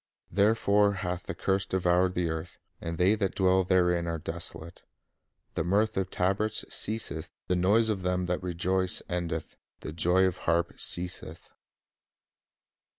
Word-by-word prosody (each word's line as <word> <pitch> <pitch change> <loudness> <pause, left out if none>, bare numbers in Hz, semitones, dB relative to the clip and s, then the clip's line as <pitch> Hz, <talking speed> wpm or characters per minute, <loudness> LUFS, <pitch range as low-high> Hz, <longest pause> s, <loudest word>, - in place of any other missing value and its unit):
Therefore 100 +1 +3
hath 90 -2 -4
the - - -4
curse 95 0 0
devoured 90 0 +1
the 90 -1 0
earth, 80 +2 -5 0.2
and 85 0 -4
they 90 +4 +4
that 100 -3 -1
dwell 95 0 +3
therein 90 -2 +2
are 85 0 -2
desolate.... 80 +2 -6 0.7
The - - -1
mirth 100 +6 +1
of 95 -1 -1
tabrets 100 +4 0
ceaseth, 105 -7 -2 0.2
the 90 - 0
noise 105 +6 +3
of 100 -3 -1
them 90 0 -1
that 90 0 -2
rejoice 90 +1 0
endeth, 85 -2 -4 0.2
the 75 - -6
joy 90 +3 +3
of 95 -1 +1
the - - -15
harp 85 +1 0
ceaseth." 90 -2 +1
90 Hz, 150 wpm, -28 LUFS, 85-95 Hz, 0.7 s, they